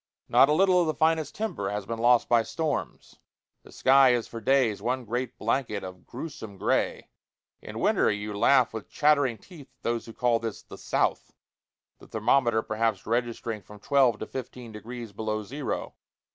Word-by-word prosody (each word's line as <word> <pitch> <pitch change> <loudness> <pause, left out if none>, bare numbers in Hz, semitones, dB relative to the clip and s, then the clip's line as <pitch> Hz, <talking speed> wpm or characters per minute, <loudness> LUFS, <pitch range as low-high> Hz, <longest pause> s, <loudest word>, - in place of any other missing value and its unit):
Not 135 - +5
a - - +4
little 185 +2 +4
of 170 - 0
the 155 - -1
finest 160 -2 +1
timber 110 - -3
has 105 -1 -4
been 115 +2 -4
lost 120 +1 +4
by 120 -1 +4
storms. 155 +4 -4 0.4
The - - -17
sky 135 -1 +5
is 120 -2 -1
for 115 - -8
days 125 -5 +2
one 125 +3 -2
great 120 +2 -3
blanket 115 -3 -1
of 90 -2 -10
grewsome 120 -7 -8
gray. - - -1 0.5
In - - -8
winter - - +2
you 105 +1 -3
laugh 130 +4 +4
with 110 -2 -7
chattering 145 -5 +2
teeth 160 - -14
at - - -49
those 115 0 -2
who 115 - -9
call 120 -1 +1
this 115 -2 -5
"the - - -11
South," - - -1 0.7
the - - -15
thermometer 115 0 +2
perhaps 110 -2 -1
registering 115 -1 -2
from 105 +1 -14
twelve 130 -2 +3
to 110 - -5
fifteen 125 -2 -8
degrees 115 +1 -8
below 110 +1 -3
zero. 140 +6 -4
120 Hz, 175 wpm, -27 LUFS, 110-135 Hz, 0.7 s, Not